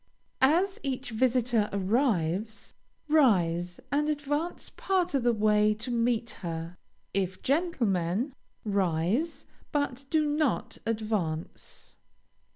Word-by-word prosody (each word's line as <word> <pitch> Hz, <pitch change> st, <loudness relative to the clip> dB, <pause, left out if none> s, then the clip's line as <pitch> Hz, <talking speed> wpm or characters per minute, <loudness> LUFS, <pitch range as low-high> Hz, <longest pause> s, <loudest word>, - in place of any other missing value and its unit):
As 350 Hz, +9 st, +3 dB
each 265 Hz, -3 st, -3 dB
visitor 240 Hz, -2 st, +2 dB
arrives, 200 Hz, -, 0 dB, 0.3 s
rise, 180 Hz, -, +3 dB
and 295 Hz, +1 st, +1 dB
advance 295 Hz, +3 st, -2 dB
part 365 Hz, -3 st, 0 dB
of 275 Hz, -, +2 dB
the 240 Hz, 0 st, +3 dB
way 210 Hz, -1 st, +3 dB
to 230 Hz, +4 st, -5 dB
meet 235 Hz, -1 st, +1 dB
her. 165 Hz, 0 st, -5 dB, 0.4 s
If 190 Hz, -1 st, -2 dB
gentlemen, 245 Hz, -, 0 dB, 0.3 s
rise, 200 Hz, -, 0 dB, 0.3 s
but 280 Hz, -2 st, -1 dB
do 310 Hz, 0 st, +2 dB
not 295 Hz, -3 st, 0 dB
advance. 215 Hz, -8 st, -3 dB
230 Hz, 100 wpm, -28 LUFS, 195-285 Hz, 0.4 s, As